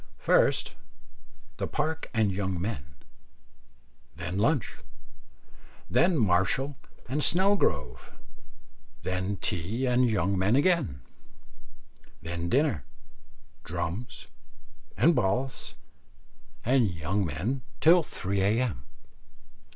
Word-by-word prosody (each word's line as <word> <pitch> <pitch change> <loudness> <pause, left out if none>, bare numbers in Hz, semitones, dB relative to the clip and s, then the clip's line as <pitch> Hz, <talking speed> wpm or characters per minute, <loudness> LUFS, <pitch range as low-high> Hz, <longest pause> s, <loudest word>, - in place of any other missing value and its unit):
First, - - +2 0.8
the - - -2
Park 155 +2 -2
and 110 -4 +2
young 95 -2 -2
men, 75 -8 -5 1.2
then 85 +4 -4
lunch, 130 +2 +1 1.1
then 175 -1 +3
Marshall 110 +7 +2 0.3
and 140 +5 -1
Snelgrove, 160 - +2 0.9
then 95 +2 -2
tea 95 +10 -2
and 125 0 +3
young 100 -3 0
men 100 +5 +3
again, 145 - +2 1.2
then 85 +1 -4
dinner, 135 - +1 0.8
drums, 90 +8 -5 0.7
and 170 - +5
balls, 125 +2 -1 0.9
and 125 -3 +3
young 85 +4 -1
men 95 - -2 0.2
till 170 +2 +6
three 100 - -3
A.M. 110 - +1
100 Hz, 90 wpm, -28 LUFS, 90-135 Hz, 1.2 s, till